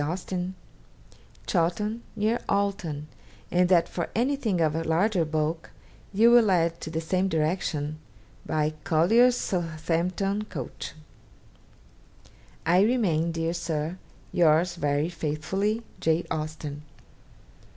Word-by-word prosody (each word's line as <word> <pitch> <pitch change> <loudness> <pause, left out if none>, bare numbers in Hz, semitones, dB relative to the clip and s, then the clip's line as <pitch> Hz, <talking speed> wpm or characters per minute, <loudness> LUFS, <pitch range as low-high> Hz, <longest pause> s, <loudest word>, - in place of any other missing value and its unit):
Austen), 180 +3 -3 0.9
Chawton, 210 +6 0
near 220 +2 +1
Alton; 185 -7 -1 0.4
and 180 0 +3
that 175 -3 +4
for 170 - -4
anything 240 -5 +1
of 155 -2 +2
a 165 +1 -1
larger 175 +3 +2
bulk, 155 +1 -2 0.4
you 225 +4 +5
will 240 -3 +6
add 170 -2 +2
to - - -5
the 160 0 -2
same 185 +4 0
direction, 155 -3 -1 0.4
by 155 0 0
Collier's 230 +10 +4
Southampton 175 +4 -1
coach. 145 - -6 1.7
'I 180 +2 +5
remain, 195 -8 +2
dear 165 0 -1
Sir, 165 0 -3 0.3
'Yours 170 +1 +3
very 145 -2 0
faithfully, 185 +7 -2 0.2
'J. 160 +2 +1
AUSTEN.' 155 -2 -4
170 Hz, 110 wpm, -27 LUFS, 155-195 Hz, 1.7 s, will